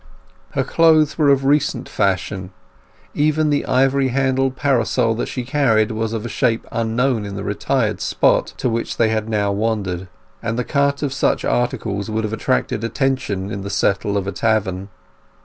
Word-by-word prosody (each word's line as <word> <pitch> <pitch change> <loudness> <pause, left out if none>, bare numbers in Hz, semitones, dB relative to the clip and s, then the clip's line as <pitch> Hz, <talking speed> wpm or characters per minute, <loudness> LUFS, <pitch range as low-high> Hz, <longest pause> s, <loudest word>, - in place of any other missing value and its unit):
Her - - +1
clothes 155 -2 +4
were 150 -2 +4
of 135 -1 +3
recent 145 +1 +1
fashion; 95 0 -1 0.6
even 155 +1 +2
the 145 - 0
ivory 135 +1 +2
handled 130 0 +1
parasol 125 -4 +1
that 115 - -3
she 125 - -4
carried 120 -5 +2
was 110 0 -2
of 115 0 -4
a - - -2
shape 115 -1 0
unknown 115 +1 0
in 100 -1 -6
the 100 - -5
retired 105 -1 -1
spot - - +2
to - - -1
which 115 -1 -2
they 115 -1 +3
had 110 0 -1
now 105 -2 +1
wandered; 100 -4 -2 0.3
and 115 0 -2
the 125 - 0
cut 140 +2 0
of 140 -2 -1
such 140 - 0
articles 115 -4 -1
would 110 +1 -1
have 110 0 -3
attracted 110 -1 -1
attention 115 -6 -1
in 100 - -4
the 100 - -5
settle 100 +1 0
of 100 - -2
a 100 - -2
tavern. 100 -2 -1
115 Hz, 175 wpm, -20 LUFS, 105-135 Hz, 0.6 s, clothes